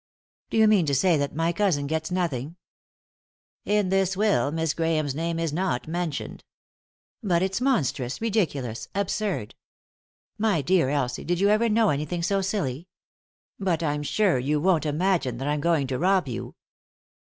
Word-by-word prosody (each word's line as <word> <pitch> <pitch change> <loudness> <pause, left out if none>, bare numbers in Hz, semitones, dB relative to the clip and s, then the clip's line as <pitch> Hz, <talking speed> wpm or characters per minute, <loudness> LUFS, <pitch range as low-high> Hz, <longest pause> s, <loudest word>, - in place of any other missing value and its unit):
" - - -64
Do - - -2
you 220 0 +6
mean 200 -7 +4
to 140 - +2
say 175 +5 +3
that 145 0 -2
my 165 +2 +1
cousin 170 -7 +1
gets 160 +2 -2
nothing? 165 -5 -2 0.6
" - - - 0.3
"In 205 -2 +1
this 190 0 +1
will 205 -8 +2
Miss 160 -1 -1
Grahame's 160 -4 0
name 165 +3 -2
is 165 -3 -2
not 175 -7 -1
men 175 +1 -1
tioned," 145 - -6 0.8
"But 180 -5 +1
it's 190 +4 -1
monstrous, 140 - 0
ridiculous, 145 - -1
absurd. 200 - -2 0.9
My 205 -9 +1
dear 175 -3 +2
Elsie, 135 -4 -1
did 175 0 -1
you 200 +1 +3
ever 220 +2 +3
know 220 0 +3
anything 150 +4 -2
so 195 +2 +1
silly? 180 -6 -2 0.7
But 175 -4 0
I'm 150 -1 -1
sure 180 0 +1
you 145 +4 0
won't 165 -2 +2
imagine 155 -5 0
that 135 +3 -4
I'm 150 0 0
going 165 -3 +2
to 130 -1 -3
rob 185 -3 +2
you." 120 - -6
165 Hz, 170 wpm, -25 LUFS, 145-195 Hz, 0.9 s, you